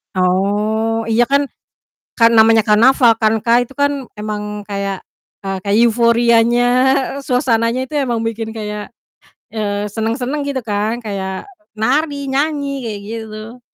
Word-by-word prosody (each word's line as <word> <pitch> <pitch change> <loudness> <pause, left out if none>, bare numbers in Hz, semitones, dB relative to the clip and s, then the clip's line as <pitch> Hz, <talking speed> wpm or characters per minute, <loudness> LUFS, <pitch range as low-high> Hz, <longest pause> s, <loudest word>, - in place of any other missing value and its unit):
Oh, 210 +5 0
iya 235 +2 +3
kan 280 +2 +2 0.8
kan 230 0 +6
namanya 225 0 +6
karnaval 230 +2 +5
kan 220 +1 +3
Kak, 240 +1 +4
itu 265 +2 -9
kan 285 0 +2 0.3
emang 210 0 -4 0.3
kayak 200 -1 -3 0.4
eee, 195 0 -3
kayak 200 +1 0
euforianya, 235 +1 +3 0.6
suasananya 245 -1 +1
itu 300 - -11
emang 235 -2 -1
bikin 225 0 -4
kayak, 210 0 -6 0.6
eee, 205 -2 -2
senang-senang 245 +6 -2
gitu 265 -2 -2
kan, 215 +2 -2
kayak 190 -2 -4 0.3
nari, 285 +7 0 0.2
nyanyi 280 -1 -1
kayak 210 -3 -5
gitu. 220 +1 -8
225 Hz, 125 wpm, -17 LUFS, 210-245 Hz, 0.8 s, kan